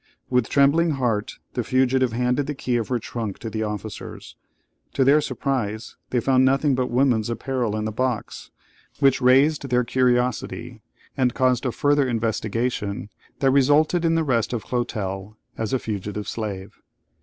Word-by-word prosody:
With 125 -3 +2
trembling 150 +4 +3
heart 115 -5 -1 0.2
the 125 - -1
fugitive 130 +1 +2
handed 125 +4 0
the 150 - -3
key 125 -2 -2
of 115 -2 0
her 125 - 0
trunk 110 -3 -5
to 115 - -7
the 110 - -3
officers. 105 0 -6 0.6
To 135 - +3
their 145 +3 +5
surprise, 125 -5 -3
they 125 - +1
found 130 +1 +3
nothing 135 +2 +3
but 130 -1 0
woman's 120 -3 +2
apparel 120 -2 -2
in 110 - -2
the 110 - -2
box, 125 0 -3 0.5
which 135 -2 +3
raised 135 +3 +4
their 125 0 +2
curiosity, 125 0 0 0.3
and 125 -2 +1
caused 130 0 +2
a - - 0
further 145 +2 +2
investigation 110 -2 -2 0.3
that 135 -1 +4
resulted 145 +5 +3
in 165 0 +2
the 165 - +2
arrest 120 -5 0
of 115 - -3
Clotel 105 -4 -3 0.2
as 110 -2 -3
a 130 - +2
fugitive 105 -2 -5
slave. 100 -4 -5
125 Hz, 160 wpm, -23 LUFS, 110-135 Hz, 0.6 s, their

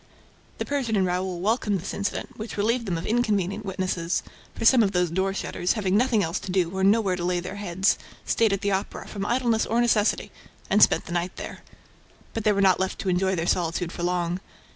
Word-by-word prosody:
The - - -3
Persian 265 -6 -1
and 190 -2 +3
Raoul 180 0 -2
welcomed 210 -1 +1
this 180 - -5
incident, 200 0 -3
which 220 0 -7
relieved 230 +3 0
them 175 -3 -1
of 165 - -5
inconvenient 215 -3 0
witnesses, 185 -3 -2 0.3
for 225 - -4
some 250 +1 +7
of 200 -2 +1
those 180 -2 +1
door 190 +2 0
shutters, 185 -2 -1
having 195 -4 0
nothing 230 -2 +3
else 165 +3 -2
to 185 - -6
do 180 -1 0
or 190 - -1
nowhere 200 -1 +3
to 175 - -4
lay 180 0 +1
their 185 +3 -6
heads, 190 -1 +1 0.3
stayed 225 -2 +2
at 195 0 -1
the 200 - 0
Opera, 195 +1 -3
from 200 -1 -4
idleness 240 -3 +1
or 230 - +1
necessity, 230 -3 +2 0.4
and 210 +2 +4
spent - - +5
the - - -9
night 175 +1 -2
there. - - -7 0.7
But 225 -1 -4
they 215 - +5
were 200 -1 +1
not 190 -2 +4
left 190 0 -1
to 190 - -2
enjoy 190 +1 +1
their 165 -1 -1
solitude 175 0 0
for 175 - -7
long. 175 0 0
195 Hz, 220 wpm, -25 LUFS, 180-215 Hz, 0.7 s, some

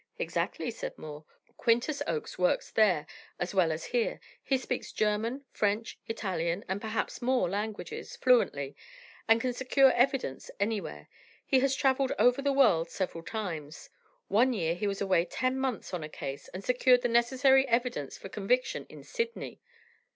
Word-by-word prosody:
"Exactly," - - -2
said - - -6
Moore. 150 0 -9 0.3
"Quintus 240 +5 +1
Oakes 455 -2 -3
works - - +1
there, 185 -9 +3 0.3
as 175 - -2
well 180 -4 +3
as 155 +1 -4
here. 240 -2 +1 0.2
He 270 - +1
speaks 255 -1 -4
German, 220 +6 -1
French, 210 +2 -1
Italian, 185 -5 -2
and 190 +2 -2
perhaps 220 0 -3
more 255 -2 +2
languages, 220 - -4
fluently, 145 - +2 0.5
and 225 0 +5
can 250 +1 -1
secure 265 +1 +4
evidence 250 - 0
anywhere. 200 - -2 0.4
He 265 - +4
has 270 0 +2
travelled 270 -1 +2
over 250 +3 +4
the 280 0 +1
world 215 -12 +4
several 175 -3 -3
times. 165 -8 -5 0.4
One 240 +6 +3
year 170 -7 0
he 180 +4 -2
was 195 -1 -3
away 190 -4 +3
ten 255 +8 -1
months 260 -7 -3
on 175 -3 -3
a 155 - -6
case, 135 -2 -6
and 185 +2 -8
secured 250 +1 +4
the - - +3
necessary 260 +3 +4
evidence 235 - -1
for - - -9
conviction 220 +6 -1
in - - -12
Sydney." 465 -1 -4
230 Hz, 160 wpm, -30 LUFS, 185-260 Hz, 0.5 s, and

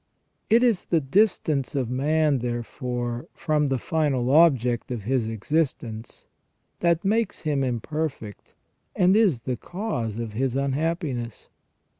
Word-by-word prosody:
It 230 +3 +5
is 230 -7 +2
the 165 - +2
distance 155 - +1
of 125 -4 -1
man, 150 +2 +2
therefore, 120 +2 -4
from 150 -2 +1
the 135 -1 0
final 135 -3 0
object 130 -7 +4
of 120 -5 -4
his 120 0 0
existence 115 -2 -3 0.5
that 170 +1 +1
makes 220 +1 0
him 145 -4 0
imperfect, 130 -3 -4 0.4
and 185 +2 +4
is 195 - +3
the 125 +1 -3
cause 125 - -4
of 115 -2 -5
his 130 +2 -1
unhappi 150 +3 -1
ness. 120 -3 -7
135 Hz, 130 wpm, -25 LUFS, 120-160 Hz, 0.5 s, It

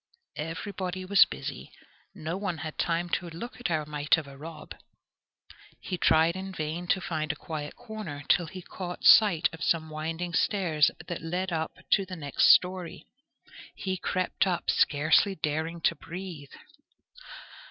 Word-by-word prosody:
Everybody 185 +3 -4
was 200 +1 +7
busy. - - -7 0.4
No 165 -2 -4
one 190 -3 -3
had 155 - -5
time 170 0 0
to 175 0 -2
look 235 +11 -8
at 245 - -2
our 155 -3 0
mite 150 +1 +2
of 160 - -4
a 140 0 -12
Rob. 155 +3 -9 1.1
He 180 -2 -5
tried 160 +2 +4
in 190 +1 -5
vain 160 +2 -4
to 190 - +2
find 160 -3 -2
a - - -7
quiet 150 -2 -6
corner, 215 -11 -7
till 175 -1 +3
he 185 +3 -9
caught 180 0 -7
sight 195 -7 +7
of 160 -1 -7
some 160 -1 +1
winding 165 +3 -4
stairs 165 -7 +3 0.2
that 170 0 -5
led 180 +3 -2
up 160 -1 -2 0.2
to 195 - +5
the 185 - -6
next 145 -5 +2
storey. 180 -2 +3 0.7
He 190 -1 -2
crept 185 +1 0
up, 175 -2 0
scarcely 155 +7 +3
daring 160 +2 -2
to - - +3
breathe. 170 -5 -8
170 Hz, 155 wpm, -28 LUFS, 155-185 Hz, 1.1 s, was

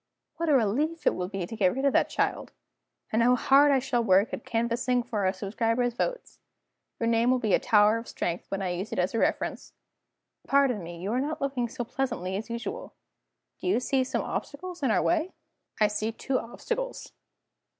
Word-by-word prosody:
What 335 -1 -1
a - - +5
relief 280 +8 +1
it - - +4
will 180 - -3
be 195 -2 -4
to 225 - -7
get 195 -2 +2
rid 270 +1 -1
of 275 - +3
that - - +3
child! - - -1 0.6
And 220 - +3
how 245 +2 +5
hard 275 +4 +5
I 275 - +4
shall 245 -2 0
work 200 +4 +3
at - - -4
canvassing 235 +2 0
for 210 -6 0
subscribers' 230 +5 -1
votes! - - -3 0.6
Your 230 - 0
name 230 +1 +3
will 255 - +4
be 220 -6 0
a - - +5
tower 210 +1 +4
of 230 - -10
strength 175 +1 -3
when 195 0 -2
I 185 - -1
use 180 +4 -4
it - - -4
as 180 +1 0
a 230 - 0
reference. - - -1 0.7
Pardon 275 -6 +3
me 170 0 -8
you 190 +4 -3
are 250 +2 +1
not 300 +3 -3
looking 265 -4 -1
so 240 - -4
pleasantly 225 -7 -3
as 210 +4 -5
usual. 240 - -5 0.6
Do - - -5
you 365 - +3
see 260 +1 +1
some 255 - -2
obstacles 350 +4 -5
in 270 - +1
our - - +2
way?" 340 +2 +1 0.5
"I 215 - +5
see 215 +2 -2
two 255 +3 -1
obstacles." - - -5
235 Hz, 200 wpm, -27 LUFS, 210-275 Hz, 0.7 s, a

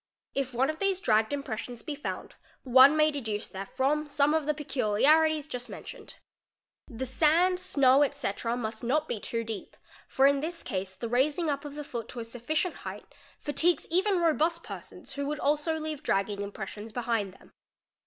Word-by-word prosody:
If 270 -1 -1
one 260 +4 +1
of 310 - -12
these 390 -2 +1
dragged 220 - +2
impressions 245 -4 -4
be 300 - -4
found, 290 - -5 0.3
one 265 +3 +7
may 305 0 +5
deduce 225 -7 -3
therefrom 270 +10 -1
some 290 +1 +2
of 315 -2 0
the 300 - +3
peculiarities 300 +4 +3
just 250 -3 -6
mentioned. - - -9 0.7
'The 260 -1 -4
sand, 330 +7 +3
snow, 275 -4 +4
&c., 280 -8 -3
must 230 -1 -2
not 300 +6 +1
be 220 - -2
too 230 +2 -3
deep, 220 -3 -6 0.3
for 265 - +3
in 280 0 +5
this 335 +4 -3
case 190 0 -3
the 235 - -4
raising 290 +7 +1
up 280 +1 -4
of 290 -1 -7
the 295 - -5
foot 235 -5 -6
to 245 - -8
a - - -3
sufficient 255 +10 -2
height - - -9 0.2
fatigues 330 +4 +1
even 380 +3 +3
robust 335 +1 +2
persons - - -9
who 280 0 -3
would 300 0 -3
also 300 +2 +1
leave 310 -2 -4
dragging 200 +1 0
impressions 205 +2 -6
behind 225 -5 -1
them. - - -19
275 Hz, 175 wpm, -29 LUFS, 230-310 Hz, 0.7 s, one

